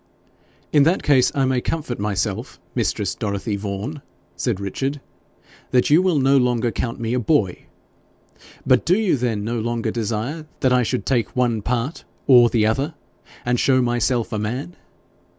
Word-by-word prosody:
'In 145 - +6
that 165 +7 +3
case 135 -4 +4
I 135 -1 +2
may 130 -1 +1
comfort 145 -7 -3
myself, 100 -2 -2
mistress - - -1
Dorothy 100 +1 -3
Vaughan,' 100 +9 -5 0.3
said 115 -6 -1
Richard, 135 +9 -3 0.7
'that 125 +2 +2
you 160 +4 +6
will 185 -4 +2
no 135 0 +4
longer 120 -2 +1
count 115 +1 -3
me 115 0 -2
a 125 - +1
boy! 110 - 0 1.0
But - - +4
do 180 +3 +3
you 215 -7 +2
then 115 -5 -1
no 115 +2 -2
longer 115 0 -2
desire 115 +8 -3
that 130 -2 +3
I 125 - +4
should 125 +2 -2
take 120 -5 0
one 120 -3 +1
part 125 +7 -2 0.2
OR 120 -3 +7
the 110 -3 +2
other 135 +8 0 0.5
and 120 0 +1
show 130 -1 +3
myself 120 -1 0
a 110 - -1
man? 125 +11 -4
125 Hz, 165 wpm, -21 LUFS, 110-135 Hz, 1.0 s, OR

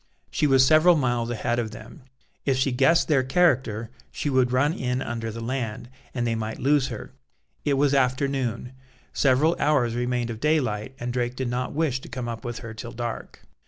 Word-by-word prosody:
She 150 - +1
was 135 -1 +5
several 155 +5 +6
miles 120 -5 0
ahead 120 +1 -1
of 115 -2 -2
them; 115 +8 -12 0.4
if 135 -2 +1
she 135 +1 +1
guessed 135 +7 +3
their 145 -4 +3
character, 130 -6 +1 0.2
she 145 - -2
would 130 -2 +3
run 140 +5 +2
in 125 -3 -2
under 115 -3 -4
the 115 +1 -6
land, 120 -1 -4 0.2
and 120 -2 -2
they 115 - 0
might 110 0 -3
lose 140 0 +2
her. - - -7 0.5
It 145 - +2
was 140 0 +2
afternoon: 130 -2 0 0.4
several 145 +5 +3
hours 140 -6 +2
remained 120 0 -1
of 110 - -7
daylight, 130 -6 0
and 120 0 -3
Drake 125 0 -1
did 130 -1 -2
not 125 +1 -2
wish 145 -4 0
to - - -11
come 125 -2 -5
up 115 -1 -5
with 120 -1 -4
her 115 - -7
till 115 +1 -8
dark. 120 -1 -6
125 Hz, 195 wpm, -25 LUFS, 120-140 Hz, 0.5 s, several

